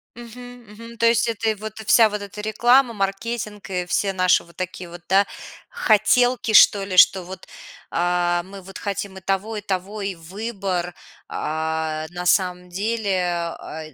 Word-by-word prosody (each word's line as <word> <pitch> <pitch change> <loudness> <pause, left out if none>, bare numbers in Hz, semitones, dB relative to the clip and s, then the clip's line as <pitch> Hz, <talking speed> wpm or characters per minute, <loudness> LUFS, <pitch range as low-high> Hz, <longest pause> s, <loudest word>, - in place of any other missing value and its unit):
Мгм, 245 +1 -11
мгм, 230 +2 -12
то 230 +1 +3
есть 235 0 +3
это 225 -1 -1
и 220 - 0
вот 215 +1 -8
вся 225 -2 +6
вот 210 -1 -5
эта 200 +1 -9
реклама, 240 +4 +3
маркетинг 210 +1 -4
и 180 -1 -2
все 195 +1 0
наши 185 -1 +3
вот 170 - -20
такие 185 -1 -6
вот, 175 0 -11
да, 195 +1 +4 0.4
хотелки, 230 +2 +2
что 200 -1 +7
ли, 190 -2 -4
что 185 +1 +6
вот, 185 +1 -10 0.4
а, 175 0 0
мы 195 +1 -11
вот 190 +1 -10
хотим 200 -1 -5
и - - -10
того, 195 +3 -2
и - - -4
того, 200 +1 -4
и 195 - -2
выбор. 185 0 -4 0.3
А, 160 0 -3
на 180 0 -4
самом 180 -1 +1
деле, 200 0 -1 0.3
а, 160 0 -8
д - - -20
195 Hz, 170 wpm, -22 LUFS, 180-220 Hz, 0.4 s, что